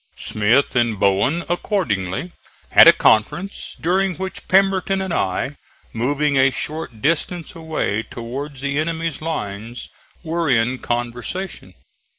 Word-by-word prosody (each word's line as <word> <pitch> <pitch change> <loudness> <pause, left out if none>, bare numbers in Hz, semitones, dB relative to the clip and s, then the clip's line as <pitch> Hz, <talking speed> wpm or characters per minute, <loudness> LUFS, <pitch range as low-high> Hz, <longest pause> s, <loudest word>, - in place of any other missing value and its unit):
Smith 115 +7 +1
and 120 -4 +1
Bowen 100 - +2
accordingly 170 - -1 0.4
had - - +9
a - - +12
conference, 175 - +1
during 185 +2 +1
which 190 0 -6
Pemberton 195 0 +3
and 190 -2 -3
I, 115 - -1 0.4
moving 140 +4 +1
a 135 0 +5
short 135 -5 -5
distance 165 +2 0
away 160 - -2
towards 130 +5 -7
the 140 +1 -1
enemy's 165 -1 -2
lines 115 -7 -5 0.3
were 165 -1 -1
in 125 +1 +2
conversation. 120 +10 -4
145 Hz, 120 wpm, -21 LUFS, 115-170 Hz, 0.4 s, a